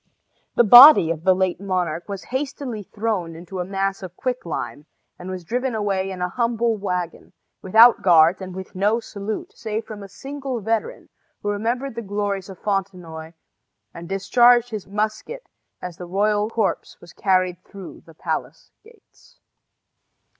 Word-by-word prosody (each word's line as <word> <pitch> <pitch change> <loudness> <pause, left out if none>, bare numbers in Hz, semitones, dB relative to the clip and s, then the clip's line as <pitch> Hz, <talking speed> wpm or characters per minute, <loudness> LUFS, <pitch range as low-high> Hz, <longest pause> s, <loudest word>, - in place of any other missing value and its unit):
The 240 - +5
body 240 - +9
of 160 -1 -5
the 185 -1 +5
late 185 0 -1
monarch 180 -3 -2
was 200 -2 -6
hastily 260 -4 -4
thrown 200 -5 -3
into 180 +3 -8
a - - -1
mass 195 +1 -2
of 185 -2 -9
quick 255 -7 -3
lime, 150 -2 -5 0.3
and 180 - -8
was 185 -1 -6
driven 245 +6 -2
away 195 -3 -1
in 185 -2 -5
a 180 - -1
humble 235 +1 0
wagon, 180 -4 -4 0.3
without 225 +5 +6
guards 170 0 +5
and 185 -1 -7
with 190 0 -8
no 205 +5 +1
salute, 210 -1 -6
save 220 -1 -4
from 210 -2 -9
a 200 - -10
single 270 +2 -6
veteran, 220 +1 -3 0.3
who 205 - -1
remembered 235 +6 -2
the 235 - -5
glories 205 -2 -3
of 190 - -10
Fontenoy 180 -5 -4 0.6
and 170 +1 -10
discharged 240 +5 +4
his 215 -3 -6
musket 215 - -4 0.4
as 180 -2 -7
the 180 - -8
royal 205 +3 0
corpse 225 -1 -2
was 175 - -15
carried 185 -2 0
through 195 -3 -11
the 165 - -16
palace - - -5
gates. 450 -2 -23
200 Hz, 160 wpm, -22 LUFS, 185-230 Hz, 0.6 s, body